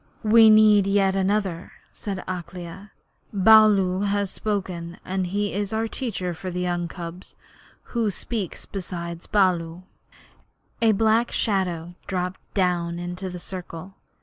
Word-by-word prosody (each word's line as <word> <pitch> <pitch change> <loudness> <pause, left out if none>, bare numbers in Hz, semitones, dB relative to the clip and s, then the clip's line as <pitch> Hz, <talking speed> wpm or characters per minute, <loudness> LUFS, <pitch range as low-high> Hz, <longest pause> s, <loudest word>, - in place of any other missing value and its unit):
'We 220 +1 +7
need 215 -2 +6
yet 195 -1 +2
another,' 190 -3 -1 0.2
said 195 -3 -6
Akela. 180 +2 -7 0.4
'Baloo 200 -2 +5
has 200 -1 0
spoken, 185 -5 -3
and 185 -1 -2
he 205 +2 -1
is 205 +1 -2
our 225 +1 0
teacher 205 -8 -3
for 185 +3 -6
the 180 0 -3
young 175 -1 -1
cubs. 170 +1 -8 0.6
Who 230 -3 +1
speaks 205 -1 -4
beside 170 -3 -6
Baloo?' 180 -4 +1 1.0
A 225 -1 +5
black 225 +3 +2
shadow 180 -5 -1
dropped 180 -1 -3 0.2
down 175 -3 0
into 175 +2 -5
the 180 - -7
circle. 180 0 -7
190 Hz, 125 wpm, -24 LUFS, 175-205 Hz, 1.0 s, We